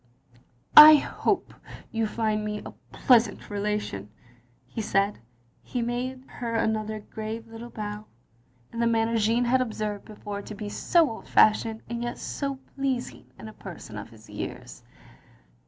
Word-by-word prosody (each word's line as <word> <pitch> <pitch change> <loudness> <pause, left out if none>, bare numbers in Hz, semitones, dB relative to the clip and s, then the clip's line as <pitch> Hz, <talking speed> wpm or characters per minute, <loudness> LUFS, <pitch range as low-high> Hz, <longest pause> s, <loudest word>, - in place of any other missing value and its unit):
" 120 0 -29
" - - -32 0.2
I - - +9
hope 295 - -1 0.4
you 225 -1 0
may - - -3
find 215 -1 -1
me 210 0 -4
a - - -7 0.2
pleasant 230 -5 +3
relation, 205 - -3 0.3
" 120 +1 -36
he 225 - -2
said 200 0 +1
and - - -25 0.4
he 245 -2 -3
made 255 +2 -3
her 235 -3 -5
another 215 -1 -1
grave 220 +2 -6
little 225 +1 -9
bow, 210 -1 -6 0.7
in 230 - -5
the 235 - +3
manner 230 0 +1
Jeanne 230 +3 +2
had 255 +2 +3
obseived 215 -4 -3
before 205 -1 -7
to 210 - -9
be 205 0 -6
so 335 +9 +3
old 225 - -8
fashioned, 220 +1 +3
and 235 0 -4
yet 240 0 -3
so 275 -1 -3 0.2
pleasing, 270 -3 -3
in - - -9
a 215 - -10
person 170 - -10
of 105 +1 -7
his 110 -1 -16
years. - - -7
220 Hz, 170 wpm, -26 LUFS, 210-235 Hz, 0.7 s, I